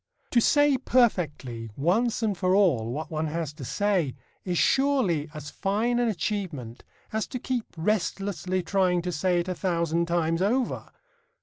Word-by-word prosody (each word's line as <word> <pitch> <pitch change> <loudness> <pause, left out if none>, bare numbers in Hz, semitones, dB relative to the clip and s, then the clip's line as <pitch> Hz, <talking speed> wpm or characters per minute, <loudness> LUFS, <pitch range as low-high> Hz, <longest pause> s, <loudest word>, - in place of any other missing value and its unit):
To 240 - +4
say 290 0 +4
perfectly 150 - +1
once 215 - +1
and 210 -3 +1
for 185 +1 +2
all 140 - +3
what 155 +6 -5
one 155 0 -1
has 155 -1 -3
to 150 -2 -10
say 180 -2 0 0.3
is 180 -2 -1
surely 250 - +2
as 150 -1 -8
fine 225 +5 0
an 240 - +2
achievement 170 - -3 0.3
as 220 0 -1
to - - -5
keep 245 -1 -2
restlessly 185 0 -1
trying 180 -3 +1
to 180 - -2
say 175 +2 +1
it 170 - -7
a 185 - -1
thousand 170 -2 0
times 165 0 0
over. 240 +6 0
180 Hz, 160 wpm, -26 LUFS, 160-215 Hz, 0.3 s, To